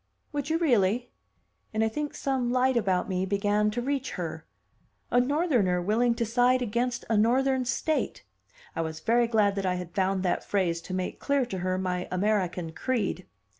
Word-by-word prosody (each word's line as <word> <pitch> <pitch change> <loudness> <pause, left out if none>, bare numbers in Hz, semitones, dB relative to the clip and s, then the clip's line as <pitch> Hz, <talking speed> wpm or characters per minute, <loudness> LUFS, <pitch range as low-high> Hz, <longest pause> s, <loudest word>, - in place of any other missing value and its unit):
"Would 290 -1 -3
you 320 - +2
really?" 245 - +2 0.6
And 220 - +2
I - - +3
think 295 +6 -4
some 260 -3 -1
light 255 +1 +2
about 195 -3 +1
me 185 -2 -1
began 205 +2 +1
to 240 +3 -3
reach 275 0 -2
her. - - -5 0.6
A 245 - +5
Northerner 250 - +2
willing 230 +6 +2
to 235 - -1
side 245 +3 +3
against 240 +2 -1
a 225 - +1
Northern 255 +4 +2
state! 310 +5 -1 0.5
I - - 0
was 160 -1 -4
very 235 +6 +2
glad 215 -3 +3
that 195 - -1
I 180 - +1
had 180 -1 -6
found 190 -1 0
that 180 - 0
phrase 175 -4 0
to 185 - -2
make 185 -1 -3
clear 280 -2 +1
to 195 -6 -5
her 185 +1 -1
my 180 -1 -2
American 185 -3 0
creed. 195 0 -2
220 Hz, 180 wpm, -27 LUFS, 185-250 Hz, 0.6 s, A